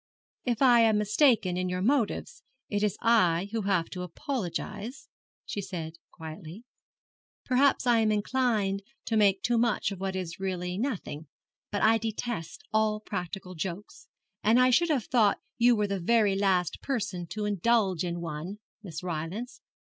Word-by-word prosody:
'If 245 0 +1
I 245 -2 +7
am 225 -2 +4
mistaken 210 -3 +3
in 185 0 -1
your 180 0 -2
motives 280 - 0 0.3
it 205 -1 0
is 210 -1 0
I 195 -6 +3
who 225 0 -1
have 180 -4 +2
to 180 - -5
apologize,' 210 - -5 0.4
she 205 - -4
said, 170 -4 -5 0.2
quietly. 160 +5 -9 0.8
'Perhaps 265 +1 +3
I 240 -2 +4
am 220 -1 +3
inclined 210 -3 +1 0.2
to 225 - -1
make 200 -3 +3
too 240 -1 +2
much 230 -3 +1
of 195 - -6
what 190 0 -3
is 180 -2 -5
really 180 -2 -3
nothing. 195 - -4 0.4
But 205 - -2
I 225 +1 +5
detest 225 -5 -4
all 215 -1 +2
practical 185 -2 -5
jokes, 180 +4 -6 0.4
and 225 +4 +5
I 255 0 +5
should 340 +7 +3
have 270 -9 +1
thought 220 -5 +3 0.2
you 240 0 +6
were 210 -1 +1
the 200 -1 -2
very 210 +1 +3
last 190 -3 +1
person 205 -10 -3
to 210 +4 -4
indulge 205 -3 +2
in 175 -1 -3
one, 170 +4 -5 0.2
Miss 175 -5 -7
Rylance. 180 +8 -5
205 Hz, 160 wpm, -28 LUFS, 180-230 Hz, 0.8 s, I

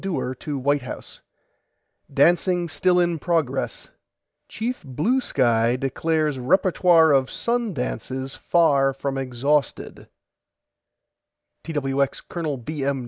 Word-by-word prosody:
DEWAR 155 -9 -2
TO 145 +2 -5
WHITE 140 +2 +1
HOUSE: 125 - -9 0.9
DANCING 175 0 +2
STILL 180 +2 +2
IN 175 -2 +1
PROGRESS 155 -6 -1 0.6
CHIEF 235 -1 -4
BLUE 155 - 0
SKY 120 - +2
DECLARES 150 +2 -1
REPERTOIRE 175 +2 +4
OF 135 -2 +3
SUN 235 -5 -2
DANCES 130 +1 -4
FAR 140 -5 +2
FROM 135 0 -3
EXHAUSTED 135 +2 -2 1.6
TWX 140 -3 -2
COL. 160 -5 -3
B. 145 +4 -5
M. 140 0 0
145 Hz, 105 wpm, -23 LUFS, 135-175 Hz, 1.6 s, REPERTOIRE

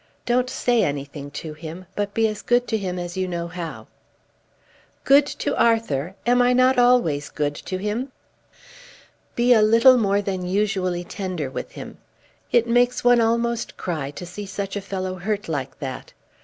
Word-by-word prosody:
Don't 250 +1 +1
say 245 -2 +1
anything 140 0 -4
to 155 +2 -7
him, 165 +4 -9
but 205 0 -3
be 225 0 +3
as 215 -1 -5
good 245 0 +2
to 225 - 0
him 185 -2 -3
as 175 -1 -5
you 185 0 0
know 170 -1 -3
how." 170 -2 -7 1.2
"Good 280 +1 +5
to 290 0 -3
Arthur! 190 -8 +1
Am 245 +1 +4
I 245 0 +4
not 255 +1 +4
always 235 -13 +3
good 145 -1 -2
to 185 +5 -5
him?" 215 +7 -3 1.2
"Be 245 +1 +4
a 220 - +5
little 230 +4 +6
more 200 -1 +1
than 190 -2 -3
usually 185 -2 0
tender 175 -7 -4
with - - -6
him. - - -9 0.5
It 235 -1 +4
makes 245 +1 +2
one 245 -1 +5
almost 235 +1 0
cry 155 -6 -3
to 160 +5 -8
see 200 +4 -8
such 195 +1 -4
a 205 - -2
fellow 190 -1 -4
hurt 205 +3 -3
like 140 -4 -4
that. 130 -2 -7
200 Hz, 170 wpm, -23 LUFS, 175-235 Hz, 1.2 s, little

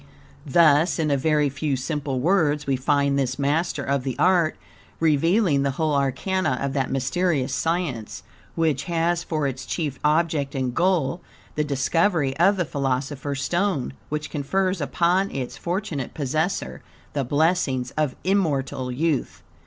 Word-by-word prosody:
Thus, 155 +2 +4
in 155 -3 0
a - - +4
very 150 +1 +2
few 140 +1 -2
simple 140 0 -2
words, 150 -2 +2
we 135 - +1
find 140 +1 +1
this 130 -1 -1
master 145 +1 0
of 140 -1 0
the 130 -2 -3
art 175 -4 +3 0.4
revealing 165 +1 +3
the 140 - +1
whole 155 -2 +1
arcana 140 +3 0
of 140 -1 -2
that 135 -2 0
mysterious 135 +1 0
science, 145 -6 -2 0.3
which 155 -4 0
has 170 0 0
for 155 -3 -2
its 135 -1 -3
chief 145 -2 -3
object 150 -2 +1
and 130 -2 -1
goal, 175 -1 +1 0.3
the 150 - 0
discovery 145 +1 +1
of 195 +4 +4
the 180 - 0
"philosopher's 140 0 -2
stone," 175 -8 0 0.2
which 150 0 -4
confers 185 +5 -1
upon 175 +6 +1
its 130 -2 -5
fortunate 170 - -3
possessor 145 - -2 0.3
the 140 - 0
blessings 145 -2 +1
of 150 -4 -1
immortal 140 -9 0
youth. 150 +2 -1
150 Hz, 145 wpm, -24 LUFS, 135-170 Hz, 0.4 s, Thus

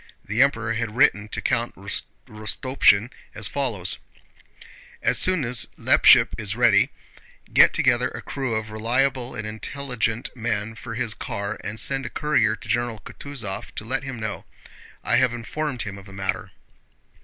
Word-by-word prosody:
The 105 +5 +1
Emperor 115 -5 +2
had 115 -1 -3
written 110 -6 +3
to - - -4
Count 120 +1 0
Rostopchín 105 +3 0 0.2
as 110 0 +1
follows: 110 -9 -1 1.0
As - - +2
soon 185 -7 +3
as 120 0 +2
Leppich - - +6
is 105 -1 -3
ready, 115 0 +4 0.6
get - - +7
together 125 +1 +2
a - - -8
crew 130 -5 -3
of 110 0 -3
reliable 125 +3 0
and 105 - -5
intelligent 115 +1 -3
men 115 -2 -2
for 115 0 -8
his 115 -2 -1
car 100 0 -4
and 110 +2 -4
send 135 -2 +1
a - - -6
courier 120 -8 +1
to 110 - -13
General 120 -1 -1
Kutúzov 120 -9 -6
to 105 - -5
let 130 +4 -1
him 135 -4 -6
know. 110 -1 -4 0.6
I - - +2
have 125 -1 +3
informed 125 +2 -3
him 100 -1 -6
of 100 - -14
the 95 - -12
matter. 95 -1 -3
115 Hz, 155 wpm, -24 LUFS, 105-130 Hz, 1.0 s, get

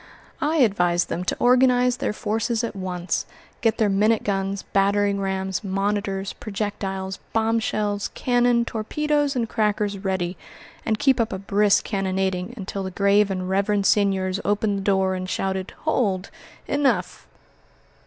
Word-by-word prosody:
I 310 +2 +1
advised 180 - +2
them 175 - -2
to - - -1
organize 250 0 +4
their - - -1
forces 225 +2 -1
at 230 - -3
once, 185 -2 -3 0.3
get 225 -1 +2
their 220 - +3
minute 210 +3 +2
guns, 195 -1 -2
battering 200 0 +1
rams, 190 0 -2
monitors, 195 0 -1
projectiles, 195 -3 -4
bombshells, 220 -2 0
cannon, 245 -1 +2
torpedoes, 290 +6 -1
and 235 -2 0
crackers 210 -2 0
ready, 190 -2 -2 0.5
and 220 -1 +2
keep 265 +2 +3
up 230 - +1
a 190 - -3
brisk 200 +1 +2
cannonading 190 0 -2
until 195 -1 -5
the 190 - -3
grave 200 +2 +3
and 185 -1 -3
reverend 200 +1 +1
seigniors 195 -2 +2
opened 205 0 0
the - - -4
door, 190 -1 +2
and 185 0 -4
shouted, 190 0 -2 0.2
"Hold, 200 -11 0 0.4
enough!" 235 -11 0
200 Hz, 140 wpm, -23 LUFS, 190-225 Hz, 0.5 s, organize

